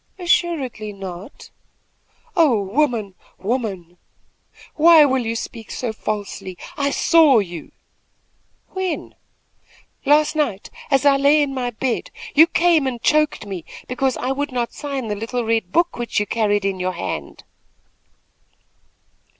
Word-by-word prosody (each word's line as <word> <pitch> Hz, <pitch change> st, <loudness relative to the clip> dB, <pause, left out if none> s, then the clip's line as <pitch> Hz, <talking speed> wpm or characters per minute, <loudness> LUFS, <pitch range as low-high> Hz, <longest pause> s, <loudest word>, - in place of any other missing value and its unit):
"Assuredly 325 Hz, -, 0 dB
not." 195 Hz, +3 st, -9 dB, 0.8 s
"Oh 300 Hz, -, +4 dB
woman, 215 Hz, -1 st, 0 dB, 0.2 s
woman! 195 Hz, -6 st, -3 dB, 0.8 s
why 320 Hz, -1 st, +7 dB
will 265 Hz, -2 st, +1 dB
you 230 Hz, -, -1 dB
speak 225 Hz, -1 st, -7 dB
so 240 Hz, -3 st, -3 dB
falsely? 205 Hz, -4 st, -5 dB, 0.2 s
I 280 Hz, 0 st, 0 dB
saw 310 Hz, -2 st, +5 dB
you." 175 Hz, -6 st, -3 dB, 1.0 s
"When?" 375 Hz, -3 st, -4 dB, 0.9 s
"Last 300 Hz, +2 st, +3 dB
night, 250 Hz, -11 st, -2 dB, 0.2 s
as 275 Hz, 0 st, +2 dB
I 280 Hz, -1 st, +6 dB
lay 290 Hz, +2 st, +4 dB
in 275 Hz, -1 st, -3 dB
my 250 Hz, -2 st, -2 dB
bed, 240 Hz, +1 st, -2 dB, 0.2 s
you 315 Hz, +3 st, +7 dB
came 335 Hz, -5 st, +3 dB
and 245 Hz, -2 st, -3 dB
choked 305 Hz, +1 st, +1 dB
me, 190 Hz, -4 st, -6 dB, 0.2 s
because 255 Hz, +1 st, -1 dB
I 255 Hz, -, -2 dB
would 285 Hz, +1 st, -2 dB
not 240 Hz, -2 st, -2 dB
sign 275 Hz, -5 st, -4 dB
the 210 Hz, -, -2 dB
little 230 Hz, +3 st, -3 dB
red 225 Hz, -5 st, 0 dB
book 340 Hz, -, +2 dB
which 240 Hz, -3 st, -1 dB
you 210 Hz, -, 0 dB
carried 205 Hz, -2 st, 0 dB
in 195 Hz, -1 st, -1 dB
your 185 Hz, 0 st, -1 dB
hand." 75 Hz, -, -5 dB
245 Hz, 135 wpm, -21 LUFS, 205-290 Hz, 1.0 s, why